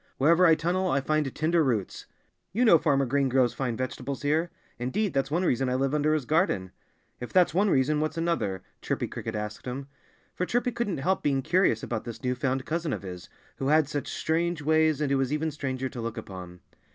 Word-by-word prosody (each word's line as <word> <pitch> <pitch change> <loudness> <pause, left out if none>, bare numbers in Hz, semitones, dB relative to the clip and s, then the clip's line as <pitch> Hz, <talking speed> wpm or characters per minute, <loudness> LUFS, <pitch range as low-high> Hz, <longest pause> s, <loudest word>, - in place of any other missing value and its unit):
Wherever 170 +6 +5
I 160 - +6
tunnel 175 +4 0
I 135 - +2
find 150 0 0
tender 160 +1 +2
roots. 115 -8 -2 0.5
You 240 +5 +2
know 170 -8 +7
Farmer 140 -3 +2
Green 135 +1 +1
grows 130 -2 +3
fine 125 -4 -2
vegetables 130 +2 -4
here. 155 +4 +1 0.3
Indeed 190 - -1
that's 135 -1 0
one 170 +5 0
reason 130 -3 +1
I 125 - 0
live 135 +2 0
under 150 +1 +2
his 150 -5 -2
garden." 150 - +1 0.5
"If 125 - -7
that's 180 -4 +4
one 200 +4 +3
reason, 150 0 +2
what's 155 +1 -2
another?" 165 - -1 0.2
Chirpy - - -2
Cricket 115 - -5
asked 105 +3 -5
him. 135 +2 -5 0.5
For 180 - -2
Chirpy 245 +1 0
couldn't 235 -5 -2
help 185 +8 0
being 135 -2 +1
curious 165 - +2
about 110 -3 -3
this 120 +2 -8
new 125 0 +1
found 130 +1 -1
cousin 165 -2 -2
of - - -5
his, 90 -2 -8 0.3
who 135 - -2
had 155 0 +4
such 145 -1 -3
strange 165 0 -1
ways 155 -1 +3
and 145 -2 0
who 135 - +2
was 135 0 0
even 155 +1 0
stranger 130 -3 -3
to 125 -3 -7
look 115 +1 -4
upon. 90 -5 -8
140 Hz, 215 wpm, -27 LUFS, 125-165 Hz, 0.5 s, know